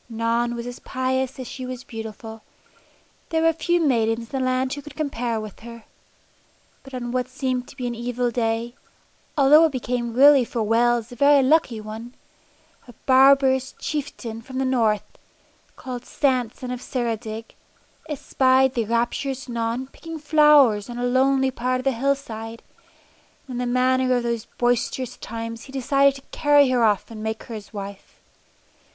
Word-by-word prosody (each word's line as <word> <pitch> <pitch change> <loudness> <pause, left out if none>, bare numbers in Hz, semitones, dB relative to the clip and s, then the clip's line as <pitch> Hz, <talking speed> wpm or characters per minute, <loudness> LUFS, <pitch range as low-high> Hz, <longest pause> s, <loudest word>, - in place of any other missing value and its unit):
Non 230 +1 0
was 235 0 -5
as 245 0 -7
pious 260 0 -2
as 255 -2 -6
she 260 - -7
was 255 0 -6
beautiful. 225 0 -8 0.9
There 320 0 +1
were 330 0 +4
few 345 +2 0
maidens 230 -5 0
in 270 - -1
the - - 0
land 255 +1 0
who 285 - -6
could 295 - -12
compare 245 -7 -2
with 215 -2 -8
her. 235 0 -11 1.0
But 270 -1 -10
on 240 -1 -4
what 250 0 -1
seemed 255 -2 -3
to - - -14
be 255 -3 -5
an 240 - -2
evil 240 +1 -2
day 230 0 -1 0.6
although 295 +3 +7
it 320 - +1
became 240 -2 -3
really 280 0 +7
for 230 -1 -3
Wales 235 +1 +2
a - - -8
very 280 +2 +5
lucky 260 -5 +2
one 220 +3 -8 0.7
a 245 - -12
barbarous 265 0 +5
chieftain 265 -6 -5
from 260 +2 -8
the 265 - 0
north, 225 -5 +2 0.7
called 250 -2 -7
Sant 255 -6 0
son 250 -1 -7
of 250 -1 -5
Ceredig, 225 -3 -4 0.6
espied 265 -2 +2
the 235 -3 -1
rapturous 240 +4 -1
Non 235 +1 -2
picking 325 +4 -9
flowers 295 -8 +4
on 240 - -6
a 245 - -1
lonely 265 +1 +2
part 255 +1 -1
of - - -5
the 270 - +2
hillside, 230 -3 -3 0.8
and 260 - -7
in - - -4
the 245 -1 -1
manner 255 0 +2
of 245 - 0
those 235 -2 -2
boisterous 245 +1 0
times 230 0 -6
he 270 - -12
decided 275 +1 +2
to 275 - -10
carry 290 -2 +5
her 250 -2 +2
off 210 +1 +1
and 215 -1 -8
make 220 0 -4
her 235 - -9
his 210 -2 -8
wife. 200 -2 -9
250 Hz, 170 wpm, -23 LUFS, 230-265 Hz, 1.0 s, although